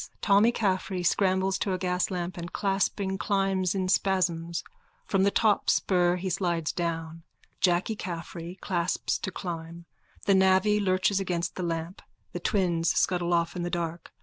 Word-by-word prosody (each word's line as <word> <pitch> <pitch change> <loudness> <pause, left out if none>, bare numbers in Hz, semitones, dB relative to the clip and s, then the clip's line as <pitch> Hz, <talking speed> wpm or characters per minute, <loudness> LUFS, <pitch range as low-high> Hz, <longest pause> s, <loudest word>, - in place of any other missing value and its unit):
Tommy 205 +3 +4
Caffrey 190 -4 -1
scrambles 190 +1 +2
to 195 - -1
a - - 0
gaslamp 180 -1 -1
and, 170 0 -6
clasping, 195 -1 -1
climbs 195 -2 0
in 190 -1 0
spasms. 175 -3 0 0.4
From 195 - +1
the 200 - +4
top 210 0 +2
spur 180 -2 +3
he 180 +1 -4
slides 170 -4 0
down. 165 -2 -3 0.4
Jacky 180 +4 +2
Caffrey 175 -1 -6
clasps 175 -1 -1
to - - -3
climb. 170 -2 -6 0.4
The 200 - +4
navvy 190 +2 +4
lurches 190 0 +2
against 180 -2 -2
the - - -5
lamp. 170 +1 -3 0.3
The - - -4
twins 175 -6 +1
scuttle 175 -1 +1
off 170 0 +1
in 180 - -3
the 175 - -2
dark. 170 -1 -4
185 Hz, 150 wpm, -27 LUFS, 170-195 Hz, 0.4 s, Tommy